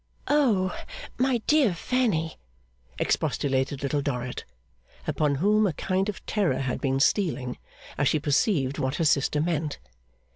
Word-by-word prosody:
'O, 225 -11 +2 0.4
my 255 -3 +1
dear 280 - +3
Fanny!' 185 -8 0 0.6
expostulated 135 0 0
Little 140 +1 0
Dorrit, 125 -3 -3 0.6
upon 150 -2 +1
whom 210 +7 +3
a 175 - -1
kind 190 +6 -1
of 205 - -7
terror 190 -11 +1
had 130 -2 -2
been 135 -1 +1
stealing 135 - +1 0.4
as 145 - +3
she 155 - +2
perceived 145 - +1
what 130 +1 -1
her 165 - 0
sister 145 0 +2
meant. 155 -2 -1
155 Hz, 135 wpm, -26 LUFS, 135-205 Hz, 0.6 s, dear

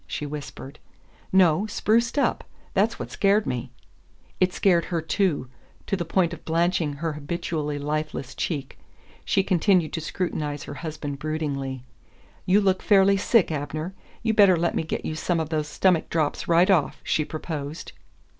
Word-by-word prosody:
she 150 - -4
whispered. 145 -1 -8 0.5
"No. 185 +1 +4
Spruced 230 +4 +1
up. 285 - +1 0.3
That's 210 +4 +2
what - - -6
scared 205 +1 +2
me." 125 -1 -3 0.7
It 185 0 +3
scared 180 -3 +2
her 170 -2 -1
too, 160 -4 0 0.4
to - - 0
the 180 - -2
point 170 0 +1
of - - -9
blanching 165 -2 +1
her 155 +2 -3
habitually 150 0 -3
lifeless 150 -2 -3
cheek. 140 -5 -4 0.4
She 195 - +2
continued 180 -3 +2
to 165 - -2
scrutinize 150 -4 -3
her - - -7
husband 150 -4 -5
broodingly. 140 -4 -3 0.6
"You 195 +3 +5
look 190 -2 +2
fairly 200 -1 +5
sick, 205 -1 +3
Abner. 155 +4 -4 0.3
You 225 -1 +2
better 200 -5 +6
let 170 +1 0
me - - 0
get 160 - -4
you - - -2
some 165 +2 -1
of 160 -2 -2
those 155 -2 -1
stomach 175 +2 +2
drops 155 -3 -1
right 175 +3 +5
off," 160 -8 +2
she 155 - +1
proposed. 155 0 -6
165 Hz, 160 wpm, -25 LUFS, 150-185 Hz, 0.7 s, better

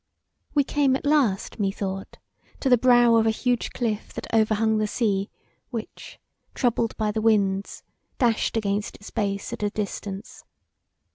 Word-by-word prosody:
We 285 - +5
came 275 -1 +2
at 270 - -4
last, 270 -10 +1
methought, 195 -1 -3 0.4
to 270 - 0
the 250 - +6
brow 240 -2 +5
of 225 0 +3
a - - +5
huge 245 +2 0
cliff 220 -4 -2
that - - -6
over 220 -1 +3
hung 220 0 +2
the 215 - +1
sea 200 -3 0 0.4
which, 230 -4 -7 0.4
troubled 235 -2 0
by 215 -1 0
the 220 +1 -2
winds, 200 -3 +1 0.3
dashed 230 -3 +1
against 205 -1 -1
its 205 - -12
base 200 -1 -2
at - - -6
a 205 - +1
distance. 205 0 -5
220 Hz, 155 wpm, -25 LUFS, 205-240 Hz, 0.4 s, the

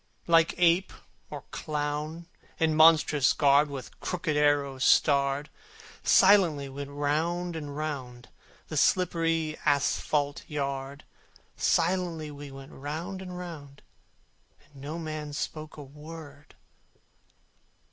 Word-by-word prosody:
Like 165 -1 +4
ape 175 +2 +3 0.4
or - - -7
clown, 150 +2 -4 0.3
in 160 -1 +2
monstrous 155 -3 +5
garb 145 0 +4
With 135 -5 -8
crooked 175 -4 -2
arrows 145 -2 +2
starred, 140 0 +3 0.6
Silently 185 -8 +5
we 135 - -11
went 140 0 -5
round 165 +4 -1
and 145 -2 -6
round 130 -6 -5 0.4
The - - -4
slippery 165 -3 +1
asphalte 145 0 +1
yard; 140 -1 -4 0.5
Silently 170 -3 0
we 145 0 -9
went 135 0 -11
round 165 +7 -6
and 180 -1 -7
round, 150 -6 -9 0.8
And 140 -2 -16
no 150 +4 -5
man 155 -2 -5
spoke 155 +2 -5
a 145 - -8
word. 150 +1 -12
150 Hz, 110 wpm, -28 LUFS, 140-165 Hz, 0.8 s, monstrous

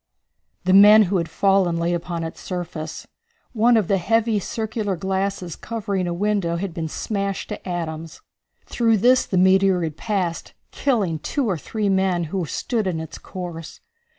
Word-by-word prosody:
The 185 +1 +2
men 210 +2 +9
who 195 0 0
had 170 -2 -2
fallen 190 -1 +2
lay 170 +1 0
upon 170 -1 -3
its 165 +1 -7
surface. 170 -4 -5 0.5
One 235 +1 +4
of 210 -6 +1
the 195 -1 +2
heavy 225 +3 +1
circular 215 -1 -3
glasses 190 -1 -2
covering 200 -5 -3
a - - -2
window 190 -2 0
had 180 0 -4
been 165 -2 -3
smashed 200 +3 -3
to - - -6
atoms. 165 -2 -5 0.5
Through 230 -2 +2
this 250 +5 +4
the 185 - -1
meteor 190 0 +4
had 160 -2 -4
passed, 190 -6 -2 0.2
killing 200 - 0
two 270 - -2
or 195 - +1
three 210 +6 -3
men 190 -2 +1
who 185 -4 -1
stood 220 - -2
in 170 -3 -1
its 160 -1 -8
course. 175 -3 -8
190 Hz, 165 wpm, -22 LUFS, 170-210 Hz, 0.5 s, men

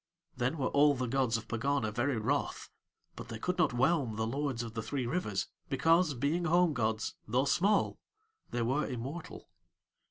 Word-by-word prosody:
Then 125 +6 -1
were 130 -3 0
all 145 0 +5
the 130 -1 -2
gods 125 -1 +1
of 115 - -9
Pegana 115 -1 0
very 120 +3 0
wroth; 135 +7 -1 0.4
but - - -8
They 115 - -6
could 180 +10 -2
not 170 - +4
whelm 130 -2 +1
the 110 +1 -1
lords 130 0 -2
of 115 -1 -7
the 115 - -3
three 130 +3 -3
rivers, 120 - -1 0.2
because 165 +2 +3
being 150 +8 0
home 175 0 +4
gods, 110 -3 -1
though 125 +5 +2
small, 200 +8 +2 0.5
they 120 - -1
were 130 +6 0
immortal. 140 +7 -6
135 Hz, 170 wpm, -32 LUFS, 115-150 Hz, 0.5 s, all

